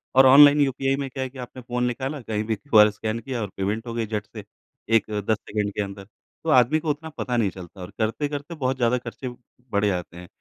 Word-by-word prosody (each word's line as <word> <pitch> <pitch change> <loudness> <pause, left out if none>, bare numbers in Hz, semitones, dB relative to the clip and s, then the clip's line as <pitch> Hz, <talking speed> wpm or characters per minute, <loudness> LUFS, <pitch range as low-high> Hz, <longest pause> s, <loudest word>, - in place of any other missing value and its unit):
और 135 - +8
online 145 +2 +8
UPI 135 0 +1
में 140 -1 -4
क्या 130 +1 -4
है 130 - -4
कि 135 - -15
आपने 125 +1 -8
फ़ोन 125 0 -2
निकाला, 130 +4 -2
कहीं 110 -2 -2
भी 110 0 -1
क्यूआर 105 -2 +5
स्कैन 110 +2 -3
किया 120 0 -4
और 105 - -3
पेमेंट 105 +5 -2
हो 115 - -4
गई 115 -1 -1
झट 105 -1 -3
से। 105 -3 -7 0.5
एक, 115 -1 +4
10 105 +1 0
सेकंड 105 -1 -3
के 105 - -2
अंदर, 100 0 -8 0.4
तो 165 - -2
आदमी 130 +3 +5
को 160 - -4
उतना 155 +2 -3
पता 125 -1 -1
नहीं 105 -4 +2
चलता 90 +1 -11
और 90 - -7
करते-करते 145 +7 -2
बहुत 130 -3 -1
ज़्यादा 120 0 +2
ख़र्चे 125 +1 -6 0.4
बढ़ 100 0 +1
जाते 90 -3 -2
हैं। 90 0 -10
120 Hz, 235 wpm, -24 LUFS, 105-135 Hz, 0.5 s, और